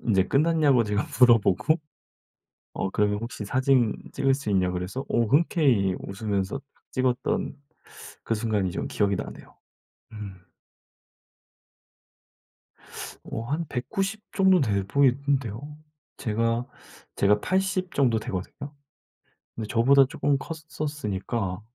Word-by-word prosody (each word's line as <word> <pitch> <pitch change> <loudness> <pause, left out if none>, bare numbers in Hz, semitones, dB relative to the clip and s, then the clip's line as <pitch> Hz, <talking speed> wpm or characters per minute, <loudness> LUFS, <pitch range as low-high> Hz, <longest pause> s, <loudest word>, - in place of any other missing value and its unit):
인제 95 -5 +2
끝났냐고 145 -5 +3
제가 105 0 0 0.2
물어보고 120 - +5 1.0
어 95 - -2
그러면 105 0 +1
혹시 115 -2 -6
사진 130 -1 +2 0.2
찍을 135 0 +2
수 135 -5 -3
있냐 95 -2 +2
그래서 90 +9 -4
어 120 - +2
흔쾌히 130 - +3
웃으면서 100 +1 -3 0.2
막 - - -35
찍었던 130 -1 -1 0.7
그 115 - 0
순간이 105 -4 0
좀 - - -3
기억이 100 -1 +1
나네요. - - -8 0.6
음. 105 -3 -7 2.9
어 110 - -5
한 150 +8 -2
190 195 - -3
정도 190 -3 +4
돼 100 -6 +1
보이던데요. 140 +1 0 0.4
제가 115 +2 0 0.5
제가 105 +1 +3
80 190 - 0
정도 120 -5 +2
되거든요. 110 +9 -6 0.8
근데 110 -1 -4
저보다 135 +5 +5
쪼끔 140 +1 0
컸었으니까 130 - -4
120 Hz, 230 characters per minute, -26 LUFS, 105-140 Hz, 2.9 s, 물어보고